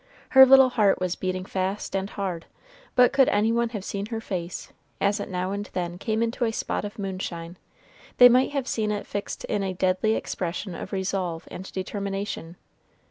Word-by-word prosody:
Her 265 -2 +9
little 265 0 +8
heart 210 -5 +3
was 185 -1 -1
beating 185 0 -3
fast 190 +1 -3
and 195 +1 -1
hard; 185 -6 -4 0.5
but 250 +1 +5
could 275 -1 +5
any 210 +2 +2
one 235 0 +1
have 210 -5 -6
seen 200 0 -4
her 225 0 -4
face, 180 -5 -5 0.3
as 200 +1 +1
it - - -5
now 185 0 -2
and 200 +1 -4
then 175 -1 -3
came 220 +2 0
into 230 +2 -2
a 225 - +1
spot - - -2
of 205 0 -6
moonshine, 185 -4 -5 0.6
they 245 - +10
might 250 +2 +4
have 275 -3 -3
seen 215 -2 -1
it 205 -1 -2
fixed 205 0 -5
in 205 - -1
a 190 -1 -2
deadly 185 +4 +1
expression 180 +2 -4
of - - -7
resolve 190 -3 -2
and 190 - -8
determination. 195 -2 -4
200 Hz, 190 wpm, -25 LUFS, 185-225 Hz, 0.6 s, they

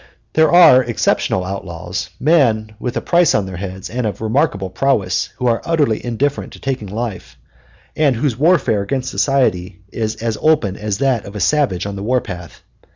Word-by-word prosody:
There 160 -1 +4
are 170 -7 +7
exceptional 115 -5 0
outlaws, 90 -1 -5
men 120 -8 +2
with 125 +2 -3
a - - -1
price 175 -1 +3
on 100 - +1
their 95 -2 -7
heads 95 0 -6
and 120 -1 -2
of 105 - -5
remarkable 110 - 0
prowess, 95 -6 0
who 125 - -3
are 115 -2 +2
utterly 145 -9 0
indifferent 130 +4 -2
to - - -12
taking 130 -6 -3
life, 95 - -5 0.6
and 145 -4 +2
whose 125 0 -1
warfare 145 - +2
against 130 +5 -3
society 95 -9 0
is 110 -1 -2
as 110 0 -3
open 150 -12 +2
as 105 -1 -3
that 130 -4 0
of 100 - -10
a - - -4
savage 100 - +1
on 100 -1 -4
the - - -6
war 125 +5 +1
path. 90 -7 -9
115 Hz, 180 wpm, -18 LUFS, 95-135 Hz, 0.6 s, are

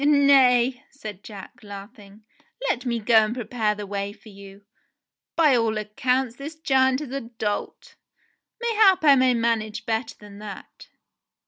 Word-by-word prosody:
"Nay," 270 -3 +4
said 215 -8 -9
Jack, 200 -3 -11
laughing. 205 0 -12 0.4
"Let 255 - -1
me 235 -1 0
go 225 +1 +3
and 215 +2 -3
prepare 225 -3 -1
the 210 0 -6
way 200 0 -4
for 220 - -17
you. 200 0 -14 0.7
By 305 -5 +4
all 225 -2 +1
accounts 245 +4 -1
this 295 +3 -7
giant 265 -3 +2
is 285 -4 -7
a 275 0 -3
dolt. 225 -3 -5 0.7
May 470 -1 -1
hap 390 -5 +4
I 285 - +8
may 255 -1 +3
manage 230 -2 -1
better 225 0 -2
than 205 -1 -13
that." 210 -2 -10
235 Hz, 150 wpm, -24 LUFS, 210-265 Hz, 0.7 s, I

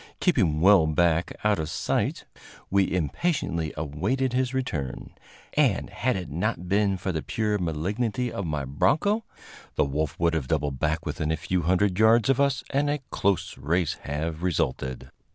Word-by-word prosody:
Keeping 95 - +2
well 95 -3 +6
back 85 +2 +2
out 105 -3 +2
of 80 0 -2
sight, - - -1 0.5
we 100 -1 +3
impatiently 85 - -1
awaited 95 - -1
his 130 0 +1
return, 70 - -3 0.4
and, - - +2
had 125 +1 0
it 90 -5 -5
not 90 +2 -2
been 100 0 +2
for 95 +1 -2
the 80 -3 -2
pure 105 +2 -1
malignity 105 +9 -1
of 100 -3 -4
my 75 -3 -2
broncho, 180 - +1 0.5
the - - +3
wolf 75 +2 -2
would 85 -1 +2
have 75 -6 -1
doubled 75 -3 -1
back 80 +1 0
within 75 +1 -2
a 80 - 0
few 90 +3 -1
hundred 90 +3 +1
yards 110 +2 +5
of 135 - +1
us, 135 -2 +1
and 145 +1 +1
a 145 - +1
close 100 -1 0
race 85 +3 +1
have 80 +3 -3
resulted. 65 -7 -2
90 Hz, 165 wpm, -26 LUFS, 75-110 Hz, 0.5 s, well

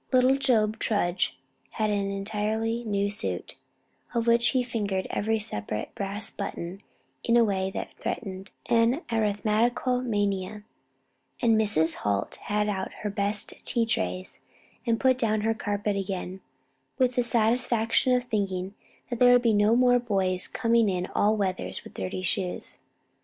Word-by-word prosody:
Little 255 +1 +4
Job 225 -5 +2
Tudge 180 -4 0 0.4
had 215 -2 0
an 200 -1 0
entirely 215 +3 -2
new 200 -1 0
suit, 210 - -3 0.6
of 230 -1 +1
which 235 0 +4
he 250 +2 +2
fingered 205 -6 -2
every 220 +2 0
separate 105 - -4
brass 200 +1 -3
button 190 -1 -5 0.4
in 235 0 +3
a 235 - +6
way 190 -3 0
that - - -4
threatened 190 -2 -5 0.2
an 235 +7 +2
arithmetical 225 +3 +1
mania; 205 -3 -1 0.8
and 230 -2 +4
Mrs. 185 -7 +2
Holt 100 -1 -1
had 210 0 0
out 190 -2 -2
her 210 - -1
best 205 +1 -2
tea 235 -2 +1
trays 90 - -2 0.5
and 230 -1 +2
put 260 -1 +3
down 215 -3 +1
her 225 +1 +1
carpet 205 -1 -2
again, 190 -1 -4 0.6
with 255 -1 +2
the 245 - +2
satisfaction 235 +1 +2
of 250 - +1
thinking 195 -5 -2 0.4
that 240 - -2
there 245 0 +7
would 245 - -4
no 215 0 +4
more 245 0 +5
be 245 - -11
boys 185 -4 +2
coming 230 -2 +2
in 180 -1 -1
all 215 +1 +3
weathers 190 -3 -2
with - - -12
dirty 95 - -4
shoes. 180 0 0
215 Hz, 150 wpm, -27 LUFS, 195-235 Hz, 0.8 s, there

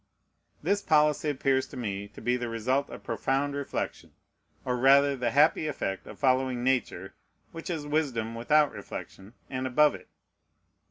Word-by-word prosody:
This 200 +5 +1
policy 150 -3 +3
appears 135 -1 +1
to 135 - -10
me 100 -4 -4
to 105 - -13
be 120 +2 +1
the 120 -1 -3
result 130 +5 0
of - - -10
profound 140 +2 -1
reflection, 140 -1 -4 0.5
or 125 - 0
rather 140 +2 +5
the 125 -2 -1
happy 155 +4 +3
effect 95 -9 -4
of - - -10
following 130 -2 +1
Nature, 125 -7 -1 0.4
which 165 +2 -8
is 160 -4 -3
wisdom 135 -7 -1
without 145 +6 +3
reflection, 100 +5 -9
and 130 0 -3
above 150 +3 +4
it. - - -11
130 Hz, 155 wpm, -28 LUFS, 120-145 Hz, 0.5 s, rather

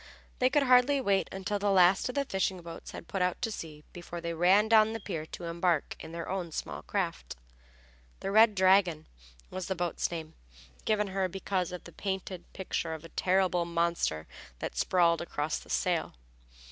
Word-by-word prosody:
They 255 - +4
could 285 +1 +3
hardly 255 +2 +5
wait 200 -6 +1
until 195 +2 -2
the 205 0 +1
last 190 +2 +5
of 250 - -5
the 280 0 +1
fishing 190 -4 -1
boats 165 0 -9
had - - -9
put 195 - -3
out 180 0 +1
to 225 - 0
sea 155 -6 -7
before 175 0 -7
they 170 0 -3
ran 185 +6 +4
down 220 0 +5
the 225 - -4
pier 165 -6 -5
to 175 - -8
embark 170 -1 0
in - - -9
their 170 0 -5
own 185 -3 -3
small 75 - -5
craft. - - -3 0.9
The 195 - -2
Red 215 0 +6
Dragon 185 -4 +4 0.5
was 185 -1 -4
the 190 - -1
boat's 175 -2 -1
name, 160 -2 -6 0.5
given 210 -2 +1
her 190 0 0
because 190 0 -2
of 180 - -7
the - - -11
painted 190 -2 -5
picture 170 -3 -3
of 160 +1 -11
a - - -10
terrible 185 -1 +2
monster 170 - 0 0.3
that - - -5
sprawled 170 -2 +3
across 155 -2 -2
the - - -16
sail. - - 0
185 Hz, 185 wpm, -30 LUFS, 170-200 Hz, 0.9 s, Red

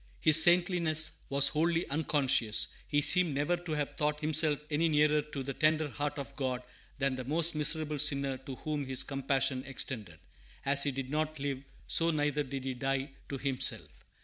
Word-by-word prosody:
His 155 0 +8
saintliness 175 -3 +3 0.2
was 140 0 +6
wholly 165 +2 -1
unconscious; 140 -7 +1 0.2
he 145 - 0
seems 175 -1 +5
never 145 +5 -1
to 175 -2 -7
have 150 -2 -4
thought 150 0 -2
himself 155 -1 +1
any 160 +3 0
nearer 150 0 +2
to 145 -2 -8
the 135 +1 -6
tender 155 +1 0
heart 145 +1 -5
of 140 -1 -8
God 130 -3 -4 0.3
than 135 -1 -1
the 130 - -6
most 160 +5 +1
miserable 150 0 0
sinner 140 -2 +1
to 135 0 -9
whom 150 -1 -5
his 130 -1 +2
compassion 135 -1 -2
extended. 115 - -4 0.5
As 140 0 +2
he 145 - +3
did 135 -1 -6
not 155 +1 -3
live, 140 -1 -5 0.2
so 165 0 +3
neither 150 -2 -1
did 135 -1 -6
he 130 0 -4
die 135 +2 -4 0.2
to 140 - -5
himself. 135 -1 -2
145 Hz, 175 wpm, -30 LUFS, 135-155 Hz, 0.5 s, His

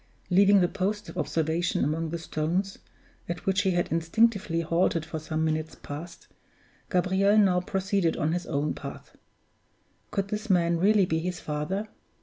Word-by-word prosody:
Leaving 200 +2 +6
the 175 - +4
post 205 +4 -2
of - - -9
observation 165 +2 0
among 160 +3 -1
the 170 - -3
stones, 170 +4 -2 0.5
at 175 +1 -4
which 195 +1 +2
he 195 - +1
had 175 -1 0
instinctively 170 +1 +2
halted 165 -1 +1
for 160 0 -5
some 155 +1 -2
minutes 155 0 -2
past, 165 +4 -9 0.6
Gabriel 190 +3 +3
now 185 -4 +4
proceeded 190 -2 0
on 155 -1 0
his 175 +1 -2
own 145 +2 -1
path. - - -9 0.9
Could 195 0 -2
this 215 +2 -4
man 170 -2 +3
really 200 +1 +4
be 160 -2 0
his 180 +2 -3
father? 155 +8 -3
175 Hz, 155 wpm, -27 LUFS, 160-195 Hz, 0.9 s, Leaving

